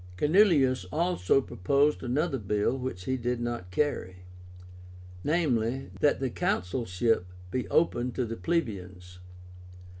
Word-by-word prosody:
Canuleius 150 - +4
also 155 - +2
proposed 140 +8 +1
another 135 +3 -1
bill 105 +3 0
which 125 -9 -5
he 130 +3 0
did 125 0 -2
not 120 -6 -4
carry; 90 -6 -2 1.0
viz. 135 -5 0
that 145 - +3
the 130 -2 -2
consulship 95 0 0 0.2
be 125 +3 -2
open 125 -6 +2
to 125 - -1
the 115 0 -4
plebeians. 95 - -3
125 Hz, 115 wpm, -28 LUFS, 100-145 Hz, 1.0 s, Canuleius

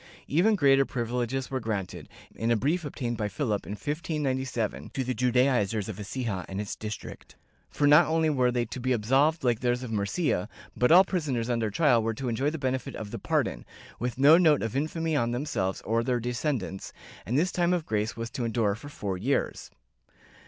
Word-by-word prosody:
^ - - -22 0.2
Even 185 +9 +3
greater 135 -6 +5
privileges 125 +1 -3
were 130 - -1
granted, 105 -5 -4 0.2
in 115 - -2
a 120 - +4
brief 160 - 0
obtained 125 -5 -4
by 105 - -1
Philip, 105 0 -2
in 100 - -4
1597, 130 - -2
to 135 - 0
the 130 0 -2
Judaizers 125 -4 +1
of 110 -4 -6
Ecija 105 -3 -3
and 95 +1 -4
its 105 -1 -4
district, 105 -2 -8 0.3
for 145 - 0
not 150 +3 +7
only 160 0 +2
were 130 -5 +2
they 120 -1 0
to 125 - -7
be 130 +1 +1
absolved 135 +8 +2
like 120 -3 +2
those 125 0 0
of 120 - -6
Murcia, 105 - -1 0.3
but 125 - +2
all 180 +3 +9
prisoners 140 -11 -2
under 115 -2 0
trial 125 0 +3
were 115 0 -1
to 130 0 -3
enjoy 130 +5 0
the 160 - -4
benefit 130 -3 -2
of 105 -2 -7
the - - -5
pardon, - - -1 0.4
with 120 0 -3
no 145 +5 +7
note 155 -7 +4
of 115 +1 -3
infamy 160 +2 -1
on 120 -5 +1
them 120 +4 -2
selves 95 -9 -2
or 115 +2 0
their 125 0 0
descendants, 120 -4 -3 0.3
and 120 +8 -1
this 180 +5 +2
time 175 -1 +1
of 175 -3 0
grace 110 +2 -2
was 115 0 -5
to 130 -2 -3
endure 115 -3 +1
for 135 +8 -9
four 100 -9 -4
years.' 135 +8 -1
125 Hz, 200 wpm, -27 LUFS, 110-145 Hz, 0.4 s, all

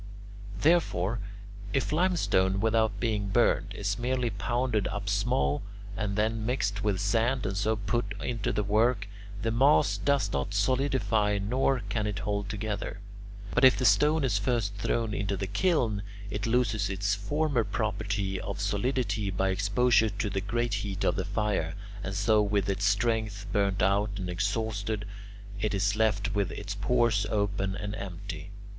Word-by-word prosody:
Therefore, 115 - +2 0.5
if 135 - 0
limestone, 150 - +2
without 110 -1 +1
being 105 -4 0
burned, 95 - +2
is 100 +2 -2
merely 125 -1 0
pounded 120 +1 0
up - - -4
small 70 +2 +1 0.3
and 105 -1 -2
then 110 +1 0
mixed 105 -4 -1
with 100 -3 +1
sand 115 +6 +1
and 95 - -2
so 110 +3 +1
put 105 0 -2
into 115 -4 -2
the 105 - 0
work, 105 +1 +2 0.4
the 115 - +1
mass 135 +6 +4
does 140 -1 +1
not 70 +9 -2
solidify 110 -2 +1
nor 125 +3 +1
can 105 -1 -1
it 105 -2 -3
hold 100 -1 -2
together. 105 -1 -4 0.5
But - - +2
if 130 -1 +7
the 130 - 0
stone 150 +9 +4
is 110 -7 +1
first 105 -2 0
thrown 110 +2 -1
into 100 -1 -1
the 95 - -2
kiln, 110 - +1 0.3
it 105 +1 -2
loses 115 -4 +1
its 100 +1 0
former 130 +5 0
property 100 -3 -2
of - - -5
solidity 105 0 0
by 95 0 0
exposure 110 +4 +3
to 105 0 -3
the 95 - -1
great 120 +3 -1
heat 100 -1 -4
of - - +2
the 95 - -2
fire, 100 -5 -1 0.3
and 95 +1 -4
so 105 +2 +3
with 100 -2 +1
its 100 0 0
strength 105 -1 0
burnt 100 -3 +1
out 100 +1 +1
and 90 -3 -3
exhausted 105 +2 -2 0.5
it 105 0 0
is 100 +1 +1
left 105 -1 +1
with 100 -4 0
its 100 0 -5
pores 110 0 +1
open 100 -2 -1
and 105 0 -4
empty. 95 -3 -7
105 Hz, 160 wpm, -28 LUFS, 100-115 Hz, 0.5 s, if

